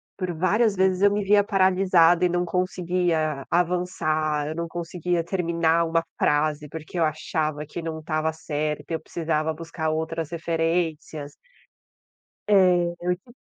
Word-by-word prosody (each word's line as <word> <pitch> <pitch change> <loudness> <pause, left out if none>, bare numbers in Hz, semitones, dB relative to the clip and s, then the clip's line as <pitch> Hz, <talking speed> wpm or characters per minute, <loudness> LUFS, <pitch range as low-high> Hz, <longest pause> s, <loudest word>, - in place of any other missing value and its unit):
por 185 -2 -3
várias 200 +6 +2
vezes 190 0 +2
eu 205 - +5
me 205 0 0
via 205 +1 +4
paralisada 185 -3 +4
e - - +2
não 175 0 0
conseguia 175 -4 -1
avançar, 155 -4 0
eu 155 - -4
não 170 0 -3
conseguia 175 0 -2
terminar 170 -2 +1
uma 165 0 +1 0.2
frase, 150 0 +1
porque 160 +2 -6
eu - - +3
achava 155 0 -2
que 165 +3 -7
não 160 -1 -4
estava 155 0 -1
certo 155 -1 -3
e - - -1
eu 160 - -1
precisava 160 -1 -2
buscar 165 -1 -4
outras 160 0 -2
referências. 165 -3 -2 1.2
É, 180 -3 +4
eu 180 0 0
tip 240 +5 -20
165 Hz, 145 wpm, -24 LUFS, 155-180 Hz, 1.2 s, eu